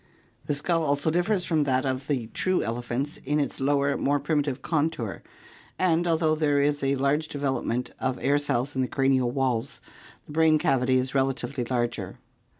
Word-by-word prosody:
The 145 - +1
skull 165 +3 0
also 145 0 +1
differs 180 +2 +1
from 160 -4 +2
that 130 0 +1
of 130 +1 -2
the 130 -6 -1
true 185 0 +1
elephants 120 +5 -3
in 150 +2 -1
its 145 - -2
lower, 140 +1 +2
more 145 +1 +1
primitive 140 -2 -1
contour, 145 - -1 0.6
and 175 -1 +2
although 160 -1 +2
there 150 -2 +2
is 145 0 +1
a 135 +1 +2
large 140 +3 +1
development 135 -4 -2
of 130 -1 -1
air 145 +2 +2
cells 140 -1 -1
in 130 - +1
the 130 - 0
cranial 135 -1 +2
walls, 130 -1 -1 0.5
the - - -12
brain 160 0 +4
cavity 130 -3 +2
is 130 0 -1
relatively 135 -1 -1
larger. 120 -1 -2
140 Hz, 170 wpm, -26 LUFS, 130-150 Hz, 0.6 s, brain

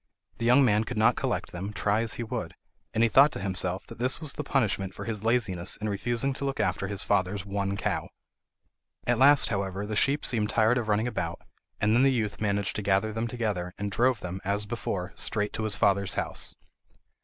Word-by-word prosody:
The 115 - 0
young 130 +3 +6
man 105 -2 +3
could 125 +1 -6
not 115 +2 +4
collect - - -2
them, 95 +4 -5
try 105 +1 +1
as 115 -2 -2
he 120 - -4
would, 110 - -5 0.4
and 110 +1 +1
he - - +6
thought 135 +6 +6
to - - -5
himself 95 -1 -2
that 115 - -12
this 125 +2 +1
was 155 -3 -1
the - - -4
punishment 105 -7 0
for - - -7
his 110 -3 -3
laziness 105 -7 0
in 110 - -4
refusing 120 +6 -1
to 135 - -6
look 135 -3 -2
after 105 -2 0
his 100 0 0
father's 100 0 0
one 100 0 -2
cow. - - -2 1.0
At 120 -1 +1
last, 145 +1 +7
however, 95 -1 -2
the 105 +1 -4
sheep 140 +7 +2
seemed 110 -4 0
tired 115 +3 +3
of 115 - -4
running 110 +2 +1
about, 120 - -3 0.4
and 105 +1 +2
then 120 - +4
the 135 0 +5
youth 110 -5 -2
managed 100 -2 0
to - - -2
gather 100 +2 +1
them 115 +1 -2
together, 105 -7 -3
and 100 0 -3
drove 120 +2 +2
them, 90 +1 -5
as 100 +2 -1
before, 100 -4 -4
straight 105 -2 -1
to 110 - -3
his 105 -2 0
father's 100 -1 +2
house. - - -3
105 Hz, 215 wpm, -27 LUFS, 100-120 Hz, 1.0 s, last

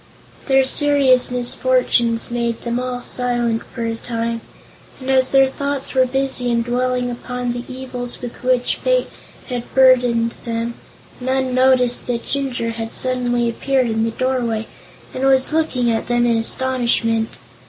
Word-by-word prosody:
Their 270 -1 +4
serious 275 -2 +3
misfortunes 245 -1 +1
made 235 -1 -2
them 235 0 -1
all 250 -1 -3
silent 240 -2 -1
for 235 - -6
a 230 - -1
time, 230 0 -3 0.6
and 265 0 -2
as 260 -1 +4
their 270 -1 +6
thoughts 280 0 -3
were 260 -1 +3
busy 265 -1 0
in 235 -1 +1
dwelling 250 +1 -1
upon 245 0 -4
the 240 0 -5
evils 255 -1 -6
with 245 -1 -8
which 250 -1 +1
fate - - 0 0.4
had 245 -2 -5
burdened 245 -3 +4
them, 230 0 -3 0.5
none 260 0 -1
noticed 255 -1 +3
that 235 -1 -2
Jinjur 260 -5 -2
had 225 0 -6
suddenly 245 -2 0
appeared 260 +3 0
in 220 0 0
the 230 - +1
doorway 235 -2 -1 0.5
and 255 - -4
was 270 +2 +4
looking 260 -7 +1
at 225 - -2
them 240 0 +2
in 235 -1 +3
astonishment. 230 -2 0
245 Hz, 150 wpm, -19 LUFS, 235-260 Hz, 0.6 s, their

